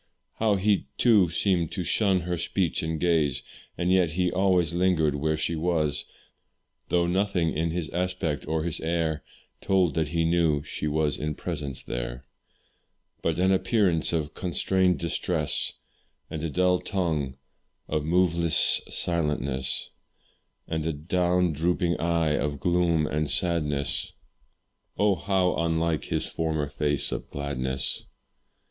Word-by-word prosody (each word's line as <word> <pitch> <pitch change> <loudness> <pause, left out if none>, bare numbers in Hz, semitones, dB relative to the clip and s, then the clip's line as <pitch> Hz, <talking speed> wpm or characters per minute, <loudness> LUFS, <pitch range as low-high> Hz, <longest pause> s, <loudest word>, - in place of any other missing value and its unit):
How 110 -2 +3
he, 100 -5 +1
too, 105 -8 +5
seemed 85 -1 +1
to 90 - -2
shun 95 +1 +2
her 90 +1 -2
speech 85 +1 -1
and 80 0 -2
gaze, 80 -6 +1 0.3
And 90 +1 0
yet 90 -4 +3
he 90 +1 +1
always 90 -3 +2
lingered 85 -4 +2
where 80 +2 0
she 80 +2 -1
was; 80 -3 0 0.8
Though 85 -1 +2
nothing 90 -2 +1
in 80 +2 0
his 85 -1 -3
aspect 90 -4 -2
or 80 0 0
his 85 -2 -2
air 80 -2 -1 0.4
Told 95 -5 +2
that 80 0 0
he 80 +2 0
knew 80 -3 +2
she 75 - -4
was 75 -1 0
in 75 0 -2
presence 75 -7 -4
there; - - -5 1.0
But 80 -1 0
an 95 +2 +3
appearance 95 -4 +2
of 80 -3 -2
constrained 90 0 +1
distress, 85 -1 -1 0.6
And 80 0 -4
a 80 - -1
dull 90 +3 +2
tongue 80 -9 -2 0.5
of 75 -1 -1
moveless 85 -1 +3
silentness, 75 -6 -1 0.8
And 80 -1 -2
a 80 - 0
down 90 +3 +1
drooping 85 +3 0
eye 85 -2 +1
of 70 -1 -2
gloom 85 -3 +2
and 75 0 -1
sadness, 75 -6 0 0.8
Oh! 105 -1 +3
how 95 0 +1
unlike 80 0 0
his - - 0
former 80 -2 -1
face 75 -1 +1
of - - -5
gladness. 65 -2 -3
85 Hz, 135 wpm, -26 LUFS, 75-90 Hz, 1.0 s, too